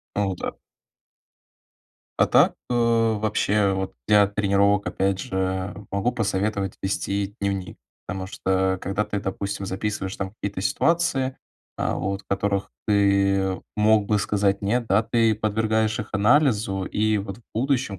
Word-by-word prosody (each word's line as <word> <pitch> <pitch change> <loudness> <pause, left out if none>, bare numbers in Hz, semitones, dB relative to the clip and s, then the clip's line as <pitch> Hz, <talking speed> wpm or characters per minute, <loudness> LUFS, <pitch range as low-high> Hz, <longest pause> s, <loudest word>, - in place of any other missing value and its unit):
О 100 -2 0
да. - - -4 1.6
А - - +5
так, - - +4 0.2
э, - - +1
вообще, 110 -3 +2
вот 95 0 -3
для 105 -1 +6
тренировок, 100 -1 +2
опять 95 +2 0
же, 95 +1 -2 0.2
могу 100 +5 0
посоветовать 100 -3 -1
вести 100 +1 -2
дневник, 100 -2 -2 0.3
потому 95 0 -4
что, 95 -1 0
когда 100 +3 -1
ты, 105 -1 -3
допустим, 100 0 -4
записываешь 95 0 -3
там 95 -1 -4
какие-то 100 -3 -5
ситуации, 135 - +1 0.4
а, - - -1
вот, 100 +1 -3
в - - -46
которых 100 0 -1 0.2
ты 100 -2 +2
мог 105 -1 +3
бы 105 0 +2
сказать 100 -1 +1
нет, 120 +4 0
да, 105 +1 +3
ты 115 -1 +2
подвергаешь 110 +1 0
их 110 - -5
анализу, 105 -3 +2
и, 110 +2 +1
вот, 100 +1 -6
в - - -21
будущем, 125 -3 0
100 Hz, 140 wpm, -24 LUFS, 95-110 Hz, 1.6 s, для